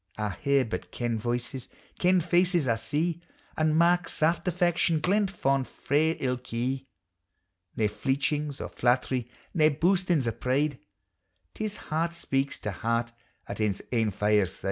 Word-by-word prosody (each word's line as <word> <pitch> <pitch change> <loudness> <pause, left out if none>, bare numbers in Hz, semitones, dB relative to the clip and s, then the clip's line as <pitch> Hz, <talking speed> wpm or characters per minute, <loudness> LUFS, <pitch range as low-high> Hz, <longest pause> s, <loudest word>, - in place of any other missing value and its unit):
I 105 -1 -1
hear 140 +7 +1
but 110 - -5
kend 120 -2 -2
voices, 120 +2 -3 0.3
kcnd 180 -1 +4
faces 175 -3 +2
I 115 -2 +2
see, 155 +9 -1 0.3
And 155 0 +2
mark 175 +1 +3
saft 165 +4 +1
affection 175 -2 +2
glent 195 +5 +2
fond 135 -8 0
frae 155 +3 +1
ilk 125 -1 -3
ee; 130 +3 -2 0.9
Nae 110 - +1
fleechings 140 +5 -1
o' - - -4
flattery, 125 0 0 0.2
nae 155 -3 +5
boastings 175 -2 +2
o' - - +2
pride, 135 +4 0 0.7
'T - - -5
is 210 -1 -3
heart 165 0 -2
speaks 135 -4 -1
to 105 - -2
heart 115 +4 -1 0.4
at - - -5
ane's 100 -2 0
ain 115 -3 +2
fireside. 105 -2 +1
140 Hz, 145 wpm, -28 LUFS, 120-170 Hz, 0.9 s, nae